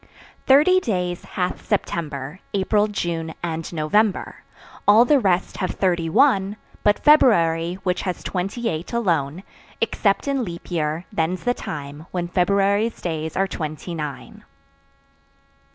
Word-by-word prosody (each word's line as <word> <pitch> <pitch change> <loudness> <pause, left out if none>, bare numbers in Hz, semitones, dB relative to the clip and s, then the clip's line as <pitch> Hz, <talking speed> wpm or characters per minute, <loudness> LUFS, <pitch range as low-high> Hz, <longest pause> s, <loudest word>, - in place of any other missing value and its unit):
Thirty 300 +8 +6
days 180 - -2
hath 180 -1 -3
September, 150 -1 -3 0.2
April, 205 +2 +2
June 170 -5 -3
and 165 -1 -3
November; 185 +6 0 0.5
All 215 +4 +7
the 290 +1 +4
rest 190 -5 0
have 185 - -1
thirty 175 -4 0
one, 205 - +3 0.2
But 205 0 +3
February, 175 - +4
which 180 -2 0
has 185 -2 -4
twenty 195 +6 -3
eight 160 +3 -4
alone. 170 -7 0 0.4
Except 210 0 +1
in 275 -2 0
leap 175 -3 -8
year; 160 0 -1
then's 165 +3 -1
the 245 - +2
time 145 -4 -7
When 175 -1 -3
February's 200 +5 +1
days 160 -2 -4
are 195 +1 +2
twenty 155 0 -5
nine. 150 -5 -7
180 Hz, 130 wpm, -22 LUFS, 165-210 Hz, 0.5 s, All